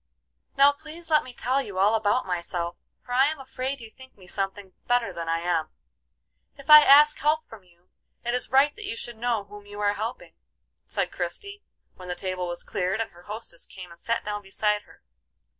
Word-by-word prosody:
"Now 280 +1 +7
please 315 +3 -10
let 305 - +5
me 255 - -10
tell 255 +2 0
you 200 -8 -7
all 200 +3 +4
about 220 +3 +2
myself, 175 -1 -3 0.3
for 245 - -7
I 265 +2 +5
am 310 -1 -3
afraid 265 +1 -4
you 225 -2 -11
think 260 0 -16
me 185 - -16
something 195 +1 -4
better 245 -1 +1
than 165 -1 -5
I 165 0 0
am. 170 -2 0 0.9
If 275 +1 -2
I 300 0 +13
ask 295 +1 +7
help 305 +2 +1
from 220 -4 -13
you, 175 0 -28 0.3
it 240 - 0
is 250 - +1
right 275 +2 +4
that 425 0 -8
you 230 - -3
should 240 0 -4
know 230 -2 0
whom 205 0 -13
you 205 0 -9
are 205 0 +2
helping," 220 +4 -5 0.5
said - - -1
Christie, 405 0 -4 0.4
when 180 - -10
the 180 - -3
table 185 0 -3
was 175 0 -4
cleared 190 +2 -1
and 225 - -2
her 175 - -17
hostess 210 -5 -6
came 180 -2 -11
and 170 - -13
sat 230 +4 -1
down 205 0 -3
beside 210 +1 0
her. - - -20
220 Hz, 210 wpm, -26 LUFS, 185-265 Hz, 0.9 s, I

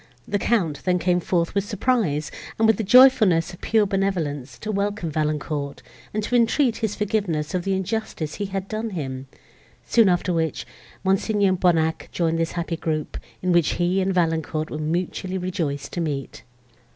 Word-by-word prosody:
The 205 - 0
Count 180 -12 0
then 180 -1 +2
came 180 0 +2
forth 170 -1 0
with 200 0 +1
surprise, 205 - 0 0.3
and 225 - +3
with 220 -2 +4
the 225 - -1
joyfulness 215 -8 +6
of 175 - -13
pure 220 -1 +3
benevolence, 165 -10 -2
to 215 - -4
welcome 200 -4 -2
Valancourt, 150 -2 -2 0.3
and 215 0 -2
to 245 - -1
entreat 240 +1 +3
his 220 -3 -2
forgiveness 195 -8 -1
of 180 -1 -1
the 195 - +1
injustice 190 -5 -3
he - - 0
had 195 0 -4
done 220 +2 -3
him; 135 -3 -5 0.6
soon 230 -4 +4
after 180 0 +1
which, 160 -2 -1 0.4
Mons. 190 0 +1
Bonnac 180 -6 +2
joined 165 -1 0
this 165 0 -1
happy 170 -1 -3
group, 155 -2 -3 0.3
in 180 - +1
which 170 -3 +3
he 180 +2 +1
and 190 +1 +1
Valancourt 160 -3 0
were 155 - -4
mutually 180 +4 -2
rejoiced 165 -6 -3
to 175 - -2
meet. 145 -5 -4
180 Hz, 170 wpm, -23 LUFS, 160-205 Hz, 0.6 s, joyfulness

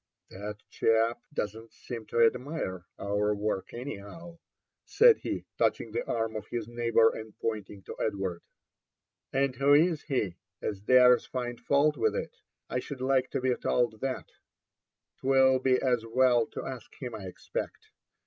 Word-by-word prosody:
*' - - -46
That 105 +2 -6
chap 115 +1 +2
don't 110 -3 -4
seem 115 -3 -8
to 115 0 +4
admire 115 - -2
our 105 +1 0
work 100 -2 -2
anyhow," 145 +8 -8 0.4
said 470 0 +6
he, - - -4
touching - - +1
the 475 - -2
arm 115 -1 -1
of 105 - -5
his 115 -3 -4
neighbour 115 -1 +3
and 110 -1 -9
pointing 105 -3 -4
to - - -8
Edward., 95 -5 -2 0.5
'* - - -61
And 135 -1 +1
who 140 +3 +5
is 160 0 +3
he 110 - -2 0.2
as 100 -2 -4
dares 125 +2 +6
find 120 -2 -4
fault 145 +1 +2
with - - +1
it? - - -4 0.2
— - - -59
I - - +2
should 135 +1 -7
like 130 0 +2
to - - -2
be 130 0 +2
told 120 -3 0
that. 135 -1 -2 0.9
'Twill 130 -1 +4
be 130 0 +3
as 125 -3 +1
well 120 0 +3
to - - -7
ask 130 -4 -7
him, 125 -4 -5
I 105 -3 -7
expect. 90 - -6
120 Hz, 165 wpm, -29 LUFS, 110-130 Hz, 0.9 s, said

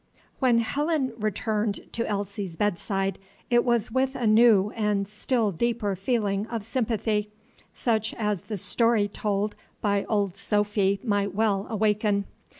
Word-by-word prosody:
When 250 -4 +4
Helen 275 +2 0
returned 215 0 -1
to 230 - -2
Elsie's 200 -3 -3
bedside, 195 0 -1 0.3
it 240 0 +5
was 235 -3 +1
with 265 +2 +1
a 240 - -2
new 215 -2 +5
and 210 -3 0
still 210 +1 0
deeper 220 +1 -1
feeling 205 0 0
of 230 -3 -4
sympathy, 220 -3 -1 0.4
such 220 -2 -1
as 210 -5 -1
the 215 - -5
story 230 +2 +2
told 205 0 -2 0.2
by 200 -1 +1
Old 200 -4 0
Sophy 205 -1 +1
might 200 -4 0
well 205 -2 +1
awaken. 210 -2 +1
210 Hz, 135 wpm, -26 LUFS, 200-230 Hz, 0.4 s, it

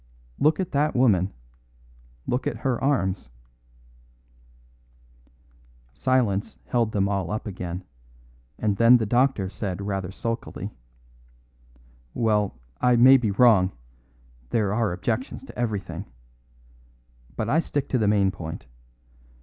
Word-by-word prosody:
Look 155 +1 +3
at 185 - -2
that 150 +1 +1
woman. 100 -7 +3 0.9
Look 125 - -1
at - - -2
her 130 -2 0
arms." 95 - 0 2.6
Silence 115 - 0
held 115 -3 0
them 100 -2 +1
all 100 -4 -1
up 105 +3 -3
again, 90 -3 -5 0.7
and 105 -2 0
then 115 +2 +7
the 115 - -1
doctor 120 -3 +2
said 95 0 -4
rather 95 -2 -3
sulkily: 115 +3 -4 1.4
"Well, 105 - +1 0.2
I 125 -1 +4
may 130 +3 +8
be 120 -4 -1
wrong; 100 -3 +4 0.8
there 105 -3 +1
are 110 -2 +1
objections 115 - -3
to - - -12
everything. 100 -6 -3 1.3
But - - -2
I 160 - +3
stick 145 -4 -2
to 130 - +1
the 105 - +2
main 100 -2 +3
point. 85 -4 -7
105 Hz, 115 wpm, -25 LUFS, 95-125 Hz, 2.6 s, may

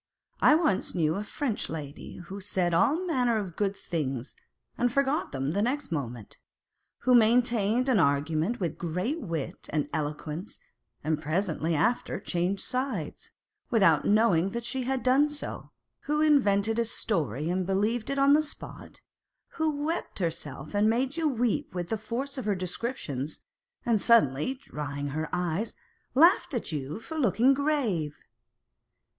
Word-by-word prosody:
I 300 - +6
once 310 - +1
knew 160 -3 +2
a 200 - -3
French 245 0 -3
lady 150 -2 -7
who 190 +3 -8
said 185 -3 0
all 300 - +3
manner 250 -9 +2
of 190 -6 -4
good 200 -1 0
things 135 -9 -3 0.4
and 245 0 +1
forgot 275 +3 +1
them 135 +1 -2
the 200 +5 0
next 255 0 -1
moment; 125 -8 -5 0.6
who 255 - +3
maintained 235 0 +4
an 250 -6 +4
argument 155 +8 +1
with 170 -5 -3
great 180 - -2
wit 165 - -5
and 150 -1 0
eloquence, 155 +4 -4 0.5
and 155 -1 0
presently 165 0 0
after 235 +11 0
changed 180 +3 -1
sides, 250 - -3 0.4
without 190 -10 +4
knowing 200 -5 +3
that 235 0 -3
she 255 +2 -3
had 265 0 -1
done 270 +4 +4
so; 295 0 -5 0.4
who 300 +1 0
invented 225 -8 +3
a 235 - +2
story 160 - -1
and 185 0 -1
believed 210 +4 0
it 275 - -1
on 275 +1 +5
the 300 - +5
spot; 305 - -9 0.5
who 310 -3 -1
wept 330 +2 -3
herself 150 -4 -4
and 205 +1 +3
made 255 +5 0
you 330 -2 +1
weep 240 -8 0
with 175 -1 -3
the 225 - 0
force 260 +6 -3
of 255 - -5
her 205 -2 +1
descriptions, 180 - -4 0.4
and 225 -4 +2
suddenly 230 - +3
drying 145 - -5
her 155 +2 -3
eyes, 180 +4 -1 0.4
laughed 330 -1 +5
at 235 - -3
you 150 +4 -4
for 320 +7 -6
looking 240 +1 +4
grave. 250 - 0
205 Hz, 150 wpm, -28 LUFS, 160-255 Hz, 0.6 s, I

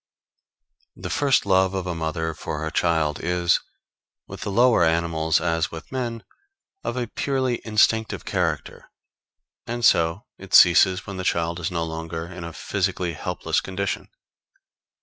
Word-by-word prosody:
] - - -45
The - - -3
first 140 -6 +2
love 95 -1 +3
of 95 -1 -2
a 90 - -2
mother 80 0 -2
for 75 0 -5
her 80 - -3
child 80 -4 +1
is, 90 0 +2 0.7
with - - -10
the - - -3
lower 120 -2 +4
animals 80 -1 +1
as 80 0 0
with 80 -1 -10
men, 120 -3 -3 0.6
of 125 - -3
a 125 - -1
purely 130 0 -1
instinctive 110 0 +1
character, - - -2 0.8
and 120 0 -1
so 85 +6 +3
it 95 -1 -2
ceases 90 +2 +6
when 100 -1 -7
the 95 - -4
child 85 -1 0
is 85 +1 -2
no 85 -2 -2
longer 80 0 -5
in 85 0 -9
a 85 - -6
physically 90 -1 -2
helpless - - -2
condition. 95 0 -4
90 Hz, 150 wpm, -24 LUFS, 80-100 Hz, 0.8 s, ceases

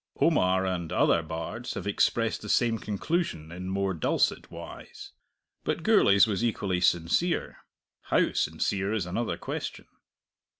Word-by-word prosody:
Omar 95 +1 +3
and 85 -4 -3
other 85 - +3
bards 80 +9 -5
have - - -5
expressed 110 +2 +1
the 105 - -8
same 115 -1 +2
conclusion 105 - -2
in 90 +2 -6
more 95 0 0
dulcet 80 - 0
wise. - - -10 0.5
But - - -2
Gourlay's 100 +1 +5
was 105 0 -2
equally 100 -6 0
sincere. 90 - +1 0.5
How - - +2
sincere 100 +1 -1
is 105 -6 -1
another 110 +6 -2
question. - - -5
95 Hz, 130 wpm, -28 LUFS, 90-110 Hz, 0.5 s, Gourlay's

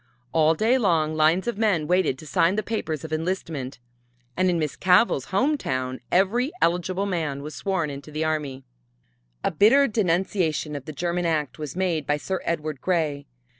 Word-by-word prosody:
All 160 0 +3
day 230 +9 +2
long 165 -8 +2
lines 155 +4 +3
of 235 -3 -2
men 200 -9 +2
waited 175 -5 +2
to 155 - -12
sign 165 +6 +2
the 215 - -1
papers 165 -9 -3
of 160 0 -6
enlistment, 160 -5 -3 0.6
and 185 0 +2
in 175 - +1
Miss 155 -3 -2
Cavell's 180 - +3
home 280 +9 +1
town 130 - -3
every 230 - +2
eligible 180 +3 +1
man 155 -7 -2
was 150 +1 -7
sworn 185 -7 -2
into 140 +2 -9
the 155 +1 -3
army. 145 -4 -2 0.8
A - - +1
bitter 230 - +5
denunciation 180 -7 0
of 140 - -6
the 155 - -6
German 175 +3 -1
act 155 -3 -1
was 150 -2 -5
made 175 -6 -1
by 145 - +2
Sir 190 +5 -3
Edward 155 -4 -2
Grey. 155 -6 -1
165 Hz, 175 wpm, -24 LUFS, 150-190 Hz, 0.8 s, bitter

